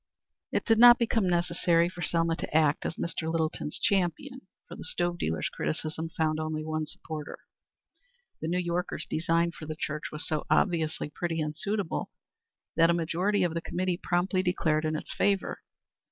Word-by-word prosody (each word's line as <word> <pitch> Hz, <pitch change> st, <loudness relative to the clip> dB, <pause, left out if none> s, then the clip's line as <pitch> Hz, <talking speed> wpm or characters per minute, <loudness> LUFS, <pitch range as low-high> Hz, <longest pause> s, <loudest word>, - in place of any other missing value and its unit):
It -, -, 0 dB
did 225 Hz, -1 st, +4 dB
not 240 Hz, 0 st, +10 dB
become 225 Hz, -5 st, +1 dB
necessary 170 Hz, -1 st, +2 dB
for 175 Hz, 0 st, -8 dB
Selma 165 Hz, -1 st, +1 dB
to 155 Hz, -, -1 dB
act 155 Hz, -2 st, +2 dB
as -, -, -4 dB
Mr. 160 Hz, -1 st, -3 dB
Littleton's 160 Hz, -2 st, -2 dB
champion, 200 Hz, -, 0 dB, 0.3 s
for -, -, -9 dB
the -, -, -8 dB
stove 175 Hz, 0 st, -1 dB
dealer's 80 Hz, +1 st, -1 dB
criticism 155 Hz, +1 st, -3 dB
found 155 Hz, -2 st, 0 dB
only 155 Hz, 0 st, -3 dB
one 155 Hz, -1 st, -2 dB
supporter. 155 Hz, -1 st, -7 dB, 1.0 s
The 160 Hz, -, -2 dB
New 175 Hz, +2 st, 0 dB
Yorker's 175 Hz, 0 st, -1 dB
design 165 Hz, +1 st, +1 dB
for 155 Hz, -2 st, -10 dB
the 155 Hz, -, -4 dB
church 150 Hz, -1 st, -4 dB
was 150 Hz, -, -4 dB
so 155 Hz, -1 st, -2 dB
obviously 160 Hz, -5 st, +1 dB
pretty 165 Hz, +1 st, -2 dB
and 155 Hz, 0 st, -2 dB
suitable 200 Hz, +1 st, -2 dB, 0.7 s
that 165 Hz, +1 st, +5 dB
a 170 Hz, -, +4 dB
majority 180 Hz, +4 st, +1 dB
of 175 Hz, -2 st, 0 dB
the 165 Hz, -, -2 dB
Committee 180 Hz, +1 st, -2 dB
promptly 185 Hz, +2 st, +1 dB
declared 160 Hz, -4 st, +1 dB
in 155 Hz, 0 st, 0 dB
its -, -, -5 dB
favor. 200 Hz, -1 st, +1 dB
170 Hz, 170 wpm, -29 LUFS, 155-180 Hz, 1.0 s, not